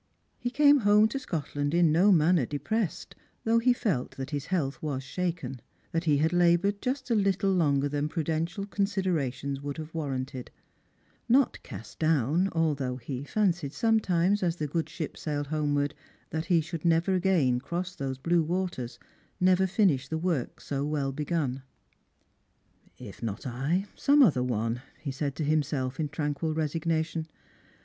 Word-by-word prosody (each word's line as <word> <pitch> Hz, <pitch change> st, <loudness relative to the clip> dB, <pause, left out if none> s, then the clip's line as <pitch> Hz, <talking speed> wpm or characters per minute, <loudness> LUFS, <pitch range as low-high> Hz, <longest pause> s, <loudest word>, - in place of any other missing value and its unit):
He 245 Hz, -, -2 dB
came 290 Hz, +2 st, +5 dB
home 210 Hz, -1 st, +5 dB
to 275 Hz, -, -3 dB
Scotland 145 Hz, -, -2 dB
in 170 Hz, -2 st, +4 dB
no 180 Hz, +6 st, +5 dB
manner 165 Hz, -5 st, +4 dB
depressed, 185 Hz, +5 st, -2 dB, 0.3 s
though 230 Hz, +1 st, +3 dB
ho 250 Hz, +2 st, +4 dB
felt 190 Hz, -, -2 dB
that 135 Hz, +2 st, -5 dB
his 145 Hz, 0 st, -3 dB
health 155 Hz, -7 st, -1 dB
was 140 Hz, -4 st, -3 dB
shaken; 140 Hz, -4 st, -3 dB, 0.3 s
that 165 Hz, +1 st, -1 dB
he 150 Hz, -3 st, +4 dB
had 160 Hz, +4 st, +1 dB
laboured 175 Hz, +3 st, +3 dB
just 255 Hz, 0 st, -2 dB
a -, -, +5 dB
little 195 Hz, -2 st, +2 dB
longer 145 Hz, -6 st, +2 dB
than 145 Hz, +1 st, -1 dB
prudential 165 Hz, +4 st, -2 dB
considerations 180 Hz, -10 st, -1 dB
would 145 Hz, 0 st, -5 dB
have 155 Hz, 0 st, -7 dB
war 160 Hz, -3 st, -3 dB
ranted; 130 Hz, -1 st, -4 dB, 0.8 s
not 260 Hz, +2 st, +3 dB
cast 105 Hz, +2 st, -10 dB
down, 160 Hz, +3 st, +2 dB
although 145 Hz, -6 st, 0 dB
he 130 Hz, +1 st, -5 dB
fancied 175 Hz, -5 st, 0 dB
sometimes, 205 Hz, -4 st, +2 dB
as 170 Hz, -3 st, +1 dB
the 155 Hz, -, -3 dB
good 160 Hz, +2 st, -2 dB
ship 155 Hz, 0 st, -5 dB
sailed 145 Hz, -2 st, -2 dB
homewards, 145 Hz, -1 st, 0 dB, 0.4 s
that 160 Hz, +1 st, -2 dB
he 170 Hz, -3 st, +3 dB
should 160 Hz, 0 st, -6 dB
never 170 Hz, +2 st, +3 dB
again 175 Hz, -10 st, +2 dB
cross 175 Hz, +7 st, -4 dB
those 135 Hz, -7 st, -4 dB
blue 170 Hz, +5 st, +2 dB
waters, 170 Hz, -7 st, -3 dB, 0.4 s
never 185 Hz, 0 st, +4 dB
finish 180 Hz, -, +2 dB
the 160 Hz, -, -2 dB
work 160 Hz, -6 st, -2 dB
so 140 Hz, -1 st, -3 dB
well 145 Hz, -2 st, -1 dB
begun. 140 Hz, -2 st, -2 dB, 0.7 s
" -, -, -39 dB
If 110 Hz, -6 st, -10 dB
not 110 Hz, -3 st, -4 dB
I, 135 Hz, +10 st, -1 dB
some 285 Hz, 0 st, +5 dB
other 150 Hz, -, +4 dB
one," 115 Hz, -1 st, -1 dB, 0.2 s
he 140 Hz, -, -4 dB
said 140 Hz, +1 st, -3 dB
to 155 Hz, -, -2 dB
himself, 145 Hz, -3 st, 0 dB
in 150 Hz, -2 st, -1 dB
tranquil 155 Hz, +1 st, -2 dB
resignation. 160 Hz, +1 st, -1 dB
160 Hz, 160 wpm, -28 LUFS, 140-185 Hz, 0.8 s, came